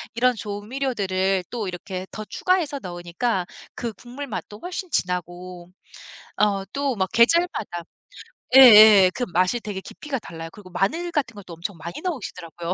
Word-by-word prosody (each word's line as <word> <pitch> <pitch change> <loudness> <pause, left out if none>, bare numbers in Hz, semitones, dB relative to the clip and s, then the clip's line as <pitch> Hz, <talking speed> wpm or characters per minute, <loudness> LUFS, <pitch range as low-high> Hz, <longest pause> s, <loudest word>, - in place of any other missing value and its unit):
이런 250 +1 +3
조미료들을 205 -4 -2
또 230 -4 -3
이렇게 185 +1 -6
더 215 - -7
추가해서 325 - 0
넣으니까 180 +2 -3 0.3
그 235 -2 -4
국물 250 +7 -9
맛도 210 -3 -7
훨씬 360 - -6
진하고 180 - -3 0.7
어 200 -2 +2
또 280 -2 -1
막 190 -2 -1
계절마다 235 - +2 0.7
예예 215 -7 +10
그 245 - -1
맛이 185 +7 +2
되게 205 -4 -6
깊이가 275 +6 -6
달라요. 165 -5 -8
그리고 205 -4 -13
마늘 265 - -1
같은 285 -8 -2
것도 190 -4 -10
엄청 170 +3 -6
많이 170 +2 -8
넣으시더라고요. 180 - -5
205 Hz, 330 characters per minute, -23 LUFS, 180-255 Hz, 0.7 s, 예예